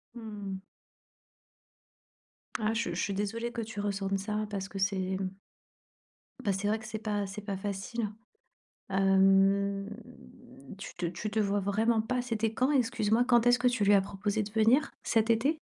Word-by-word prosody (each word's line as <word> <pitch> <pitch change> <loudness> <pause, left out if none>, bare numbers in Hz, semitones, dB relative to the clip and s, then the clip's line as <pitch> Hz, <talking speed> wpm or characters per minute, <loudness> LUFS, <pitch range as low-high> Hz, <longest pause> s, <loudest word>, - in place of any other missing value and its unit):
Mmh. 210 -4 -6 2.0
Ah, 215 -1 +1
je 230 +1 -1
je - - -3
suis 200 - -1
désolée 225 +4 -2
que 235 - -4
tu 215 -1 -7
ressentes 195 -1 -1
ça, 210 +2 -2
parce 195 -1 -4
que 200 - -8
c'est 195 0 +1 0.2
mmh 190 -1 -2 1.1
bah, 205 -6 +1
c'est 195 +2 -2
vrai 220 +1 +1
que 220 - -11
c'est 220 -1 -4
pas 205 -2 -1
c'est 200 +2 -7
pas 200 -1 -4
facile, 205 +3 -3 0.8
hem. 195 +1 +3 0.9
Tu 195 - -8
te 175 - -3
tu 175 +5 -4
te 220 - 0
vois 205 -1 +1
vraiment 220 +3 +2
pas, 250 +3 -1
c'était 225 -2 -1
quand? 255 +5 +2
Excuse-moi, 235 -4 +2
quand 240 -2 +4
est-ce 245 0 +5
que 250 - +3
tu 245 -4 +1
lui 205 +1 +5
as 200 - +6
proposé 205 +2 -2
de 205 - -8
venir? 230 +7 +3
Cet 225 0 +2
été? 270 +8 +2
210 Hz, 170 wpm, -30 LUFS, 195-225 Hz, 2.0 s, as